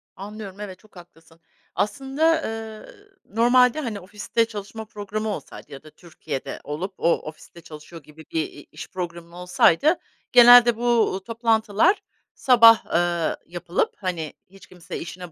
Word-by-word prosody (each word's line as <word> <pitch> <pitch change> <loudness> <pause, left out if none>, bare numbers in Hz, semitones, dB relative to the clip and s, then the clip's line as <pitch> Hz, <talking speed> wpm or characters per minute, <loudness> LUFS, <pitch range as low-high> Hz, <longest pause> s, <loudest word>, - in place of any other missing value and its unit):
Anlıyorum, 205 0 -9
evet, 190 -3 -8
çok 215 -2 -24
haklısın. 165 -2 -17 0.4
Aslında, 285 +8 0
ııı, 225 - -9 0.2
normalde, 245 +5 +3
hani, 225 -8 -4
ofiste 210 +4 -2
çalışma 220 0 -8
programı 215 +1 -5
olsaydı 205 - -8
ya 135 - -10
da 155 - -14
Türkiye’de 150 -5 -8
olup 175 +7 -5
o, 170 - +2
ofiste 160 +2 -12
çalışıyor 155 0 -12
gibi 155 +2 -16
bir, 160 - 0
i 145 - -14
iş - - -9
programın 170 -2 -7
olsaydı 180 - +2 0.4
genelde 245 -1 +8
bu, 240 - -6
uuu, 225 -5 +1
toplantılar 230 - +1 0.3
sabah, 230 -3 +6
ııı, 170 -1 0
yapılıp, 175 +1 -3
hani, 175 -5 -4 0.2
hiç 195 0 -17
kimse 180 -2 -9
işine 175 0 -9
200 Hz, 140 wpm, -23 LUFS, 170-230 Hz, 0.4 s, genelde